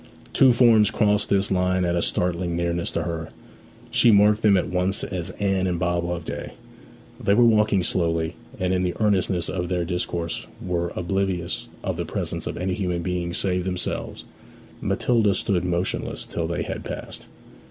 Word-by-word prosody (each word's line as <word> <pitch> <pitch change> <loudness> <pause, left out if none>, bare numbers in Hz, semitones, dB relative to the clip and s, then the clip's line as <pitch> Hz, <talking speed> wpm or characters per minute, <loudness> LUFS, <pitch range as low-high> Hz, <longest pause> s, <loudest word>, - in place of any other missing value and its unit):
Two 130 -2 +6
forms 115 -3 +5
crossed 105 -1 +1
this 100 0 +2
line 90 0 +2
at 85 0 0
a 85 - +1
startling 90 -1 0
nearness 85 0 -1
to - - -2
her; 85 -1 -4 0.6
she 120 - +5
marked 105 0 +5
them 105 -3 +5
at - - 0
once 90 +1 0
as 90 -2 -4
Anne 95 -2 +1
and 90 -1 -1
Bob 85 0 0
Loveday. 85 -1 -5 0.7
They 100 - +4
were 120 +2 +6
walking 105 -4 +3
slowly, 85 -2 0 0.2
and 90 0 0
in 90 - +1
the 90 -1 -1
earnestness 95 -4 +1
of 90 -2 -3
their 90 -2 0
discourse 85 -1 -3
were 85 -1 -2
oblivious 90 -1 -2 0.2
of - - -2
the - - -2
presence - - -4
of - - -4
any 90 +1 -1
human 90 -3 -2
beings 90 -1 -2
save 90 -2 0
themselves. 90 -1 -4 0.6
Matilda 110 -5 +2
stood 90 -1 0
motionless 90 +1 -2
till - - -3
they - - -2
had - - -5
passed. - - -7
90 Hz, 170 wpm, -24 LUFS, 85-100 Hz, 0.7 s, Two